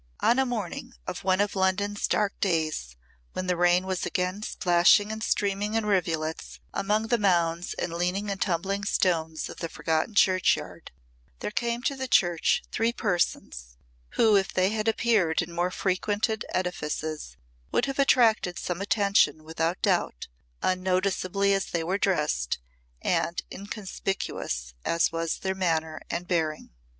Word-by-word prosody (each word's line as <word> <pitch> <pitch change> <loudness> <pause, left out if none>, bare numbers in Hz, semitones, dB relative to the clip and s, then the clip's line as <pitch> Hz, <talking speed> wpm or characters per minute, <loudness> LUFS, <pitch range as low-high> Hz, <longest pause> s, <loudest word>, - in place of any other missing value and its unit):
On 245 - +4
a 265 - +2
morning 215 - -4
of - - -5
one 190 0 +2
of 205 0 +1
London's 200 +2 0
dark 205 -2 +1
days 155 - -1 0.4
when 185 - -3
the 180 -1 +1
rain 175 +1 +3
was 190 -1 -2
again 185 +3 -1
splashing 185 +2 +4
and 220 0 -5
streaming 205 0 0
in 225 -1 +1
rivulets 165 -5 -1
among 210 +3 0
the 240 -1 +2
mounds 175 -3 +1
and 170 - -3
leaning 180 +4 -1
and 195 - -5
tumbling 195 +2 0
stones 160 -5 0
of - - -9
the 165 - -4
forgotten 160 +7 -1
churchyard, 185 -2 +2 0.5
there - - -4
came 235 +2 -1
to 275 - 0
the 265 -1 -4
church 175 -8 +3
three 225 +1 +1
persons 170 - -2 0.4
who 220 -2 +5
if 195 -1 +2
they 185 +1 +2
had 215 +1 -2
appeared 220 -7 +2
in 175 -1 -2
more 175 +1 0
frequented 205 +5 -1
edifices 155 - -3 0.3
would - - +2
have 275 0 -4
attracted 225 -9 +4
some 180 +1 -3
attention 200 -6 +2
without 165 +2 -2
doubt, - - 0 0.4
unnoticeably 185 +1 +1
as 195 -1 0
they 170 -1 -2
were 185 +4 -1
dressed 150 - 0 0.5
and 170 - 0
inconspicuous 195 - -4
as 165 0 +2
was 165 0 -2
their 190 0 -2
manner 160 -4 -1
and 175 +1 -3
bearing. 160 -4 -1
185 Hz, 150 wpm, -27 LUFS, 170-205 Hz, 0.5 s, who